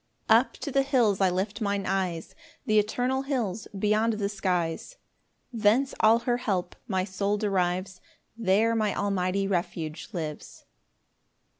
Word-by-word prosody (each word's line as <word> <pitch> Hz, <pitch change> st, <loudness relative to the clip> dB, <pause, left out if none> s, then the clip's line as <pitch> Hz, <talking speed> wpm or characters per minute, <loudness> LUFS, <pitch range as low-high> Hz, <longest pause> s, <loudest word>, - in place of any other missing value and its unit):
1 -, -, +8 dB
Up -, -, -4 dB
to 285 Hz, -, -6 dB
the 275 Hz, -, +3 dB
hills 245 Hz, -8 st, +2 dB
I 190 Hz, -, +5 dB
lift 195 Hz, +5 st, -2 dB
mine 200 Hz, -2 st, -1 dB
eyes, 185 Hz, -3 st, -2 dB, 0.3 s
Th' -, -, 0 dB
eternal 245 Hz, +5 st, +1 dB
hills 235 Hz, -7 st, -2 dB
beyond 215 Hz, +3 st, +2 dB
the 205 Hz, -2 st, -2 dB
skies; 185 Hz, -, -2 dB, 0.6 s
Thence 230 Hz, +5 st, +2 dB
all 220 Hz, +1 st, +6 dB
her 245 Hz, -1 st, +2 dB
help 185 Hz, -7 st, -2 dB
my 190 Hz, -4 st, 0 dB
soul 200 Hz, +2 st, -1 dB
derives; 185 Hz, -2 st, -1 dB, 0.3 s
There 225 Hz, +1 st, +2 dB
my 215 Hz, -2 st, 0 dB
Almighty 195 Hz, -1 st, 0 dB
refuge 170 Hz, -3 st, -3 dB
lives. 155 Hz, -6 st, -6 dB
200 Hz, 140 wpm, -27 LUFS, 185-225 Hz, 0.6 s, 1